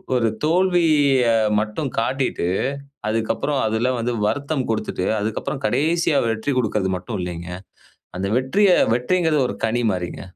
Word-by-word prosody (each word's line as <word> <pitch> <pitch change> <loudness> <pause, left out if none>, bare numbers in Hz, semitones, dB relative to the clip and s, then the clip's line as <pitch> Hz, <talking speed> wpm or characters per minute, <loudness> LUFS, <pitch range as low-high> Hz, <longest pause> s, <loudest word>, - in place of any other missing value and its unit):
ஒரு 120 -2 +2 0.2
தோல்விய 160 -6 +3 0.4
மட்டும் 105 +7 -3
காட்டிட்டு, 130 -2 -1 0.6
அதுக்கப்புறம் 115 +6 -1
அதுல 110 +3 0
வந்து 120 +1 -1
வருத்தம் 140 +2 -1
கொடுத்துட்டு 110 -4 -2 0.2
அதுக்கப்புறம் 110 +6 -3
கடைசியா 165 +2 +1
வெற்றி 110 +5 -1
கொடுக்கறது 105 -5 0
மட்டும் 95 +4 -5
இல்லைங்க. 90 -1 -5 0.7
அந்த 95 +1 -2
வெற்றிய 190 +11 +2 0.2
வெற்றிங்கிறது 155 +5 +1
ஒரு - - -5
கனி 115 +2 0
மாரிங்க. 90 -2 -4
125 Hz, 120 wpm, -21 LUFS, 110-150 Hz, 0.7 s, தோல்விய